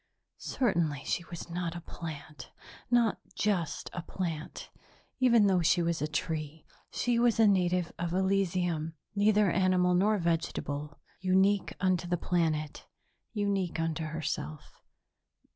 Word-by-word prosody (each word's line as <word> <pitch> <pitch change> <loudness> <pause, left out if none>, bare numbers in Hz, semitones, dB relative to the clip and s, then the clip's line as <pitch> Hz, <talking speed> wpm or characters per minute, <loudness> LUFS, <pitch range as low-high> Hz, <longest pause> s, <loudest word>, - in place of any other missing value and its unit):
Certainly 170 - 0
she 175 - -1
was 170 0 -8
not 170 0 -3
a 170 - -6
plant, 155 -3 -8 0.4
not 235 -3 +3 0.2
just 190 -7 -1
a 175 - -4
plant, 165 -2 -5 0.5
even 235 -4 +5
though 190 -3 +3
she 170 +1 +3
was 170 -3 -1
a 150 - 0
tree. 155 0 -3 0.2
She 240 -1 0
was 235 -1 +3
a 225 - +7
native 180 -3 +2
of 170 -1 -2
Elysium, 180 -4 0 0.2
neither 205 -1 +3
animal 185 -1 +3
nor 205 +4 +3
vegetable, 150 -4 -2 0.2
unique 190 +2 +2
unto 185 -2 +1
the 175 0 0
planet, 160 -4 -1 0.5
unique 200 -5 -1
unto 165 0 -1
herself. 155 -1 -4
175 Hz, 125 wpm, -30 LUFS, 160-195 Hz, 0.5 s, a